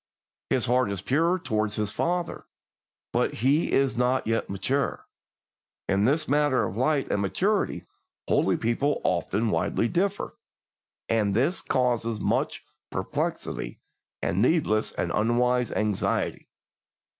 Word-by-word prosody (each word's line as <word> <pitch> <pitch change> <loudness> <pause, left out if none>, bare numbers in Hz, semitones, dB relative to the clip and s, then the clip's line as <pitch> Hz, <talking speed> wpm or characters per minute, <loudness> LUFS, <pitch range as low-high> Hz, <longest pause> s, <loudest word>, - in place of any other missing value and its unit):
His 130 -3 +2
heart 125 -1 +2
is 95 -2 -4
pure 165 - +2
toward 110 - -1
his 105 -1 -2
father, 175 0 -2 0.7
but - - +1
he 135 +8 +2
is 135 -1 +2
not 125 +2 +1
yet 115 +1 -1
mature. 130 +8 -1 0.8
In 100 +1 +2
this 155 +5 +1
matter 145 -4 +2
of 95 - -3
light 135 +4 +1
and 100 - +1
maturity 195 - 0 0.4
holy - - +2
people 125 +6 0
often 105 +5 0
widely 115 - +1
differ, 195 +7 -1 0.7
and 105 -3 +1
this 140 - +1
causes 120 -3 0
much - - -1 0.2
perplexity - - -3 0.4
and 95 - +1
needless 120 -6 +2
and - - -2
unwise 125 +2 +2
anxiety. 105 -2 -1
125 Hz, 120 wpm, -26 LUFS, 110-145 Hz, 0.8 s, His